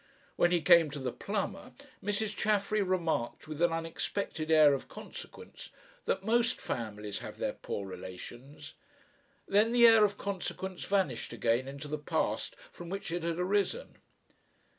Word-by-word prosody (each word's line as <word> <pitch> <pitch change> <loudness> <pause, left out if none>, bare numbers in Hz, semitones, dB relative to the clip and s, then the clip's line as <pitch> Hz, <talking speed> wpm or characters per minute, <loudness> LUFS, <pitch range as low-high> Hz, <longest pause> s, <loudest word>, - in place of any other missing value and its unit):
When 175 - +4
he 175 -3 +2
came 170 -1 +7
to 145 - -6
the 130 -2 -2
plumber, - - -4 0.3
Mrs. 205 +1 -1
Chaffery 210 0 +1
remarked 170 -10 -1
with 155 +1 -6
an 175 - +4
unexpected 165 0 -3
air 155 -2 +7
of 135 - -3
consequence - - -10 0.4
that - - 0
most 235 +1 +2
families 105 -3 -4
have - - -8
their - - -1
poor 100 - -5
relations. 120 +10 -9 0.7
Then 215 +4 +3
the 240 -1 +7
air 225 -2 +8
of 205 -1 +2
consequence 190 -1 -4
vanished 165 -13 0
again 120 +3 +1
into 140 +2 -7
the 150 +1 -3
past 145 - -1 0.2
from 175 -1 -9
which 195 -2 -4
it 175 +1 -2
had 165 0 -2
arisen. 200 - -1
170 Hz, 150 wpm, -31 LUFS, 140-200 Hz, 0.7 s, air